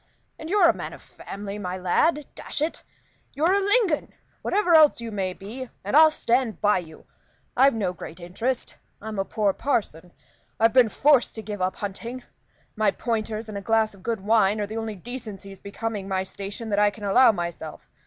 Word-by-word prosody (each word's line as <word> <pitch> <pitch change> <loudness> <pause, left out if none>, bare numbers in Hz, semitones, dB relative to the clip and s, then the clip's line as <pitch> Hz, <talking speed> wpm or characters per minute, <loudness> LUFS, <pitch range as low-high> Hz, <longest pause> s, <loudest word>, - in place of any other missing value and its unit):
And 315 - -7
you're 390 -2 +5
a - - +5
man - - -6
of - - -12
family, 200 +1 -8
my 185 -2 -4
lad 290 - +1
dash - - -4
it! 310 +3 -2 0.5
You're 325 +6 +2
a 400 - +4
Lingon, 405 -5 +1 0.3
whatever 390 -4 +1
else 310 -5 +6
you 230 -1 -6
may 190 -3 -2
be, 235 +7 -8
and 205 +7 -2
I'll 315 +1 +9
stand 245 -5 0
by 205 -2 +3
you. 160 -3 -12 0.5
I've 270 0 +5
no 195 -5 -1
great 170 -1 -10
interest; 225 +9 -3 0.2
I'm 215 -1 -6
a 195 - 0
poor 205 -2 0
parson. 180 - -2 0.5
I've 225 0 +4
been 250 -3 +6
forced 275 +3 +3
to 220 - -6
give 205 -2 -6
up 185 +1 0
hunting; 230 +5 -6 0.5
my 215 -2 +3
pointers 220 0 -3
and 205 -2 -5
a - - -9
glass 220 0 +1
of 195 - -17
good 225 +1 -2
wine 210 0 +3
are 205 - 0
the 215 +2 -6
only 225 -1 -4
decencies 200 -3 -8
becoming 205 0 -4
my 190 -1 -1
station 200 +4 -6
that 205 - +2
I 210 0 +5
can 205 +1 -12
allow 235 +5 +6
myself. 170 -4 -6
215 Hz, 195 wpm, -25 LUFS, 195-255 Hz, 0.5 s, I'll